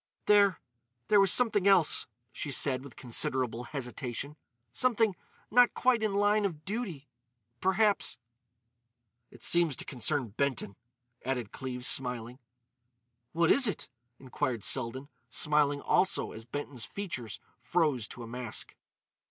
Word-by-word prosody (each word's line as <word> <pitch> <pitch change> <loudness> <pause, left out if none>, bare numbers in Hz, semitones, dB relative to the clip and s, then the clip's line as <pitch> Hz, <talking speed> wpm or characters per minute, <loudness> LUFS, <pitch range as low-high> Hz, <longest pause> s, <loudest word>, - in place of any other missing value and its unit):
"There—there 130 - +1
was 195 -2 +6
something 210 -5 +4
else," 190 -5 +4 0.2
she - - -5
said 130 +1 +2
with 140 -3 -12
considerable 125 -1 -1
hesitation—"something 140 - -2 0.4
not 245 +2 +5
quite 250 -3 +2
in 215 -2 -1
line 205 +1 +2
of 160 -6 -4
duty—perhaps——" 150 - -2 1.1
"It - - -17
seems 170 -5 +3
to - - -6
concern 125 0 -1
Benton," 120 -3 -2 0.5
added 125 -5 -3
Cleves, 125 -2 -4
smiling. 125 -1 +1 0.9
"What 170 0 +3
is 270 -3 +5
it?" 205 - -4 0.3
inquired 125 -4 -3
Selden, 130 +2 +1 0.2
smiling 150 -2 +2
also 190 - +1
as 110 +1 -10
Benton's 130 -1 -5
features 170 - -6 0.2
froze 135 -4 0
to 120 - -9
a - - -9
mask. 120 -1 -5
140 Hz, 115 wpm, -30 LUFS, 120-190 Hz, 1.1 s, was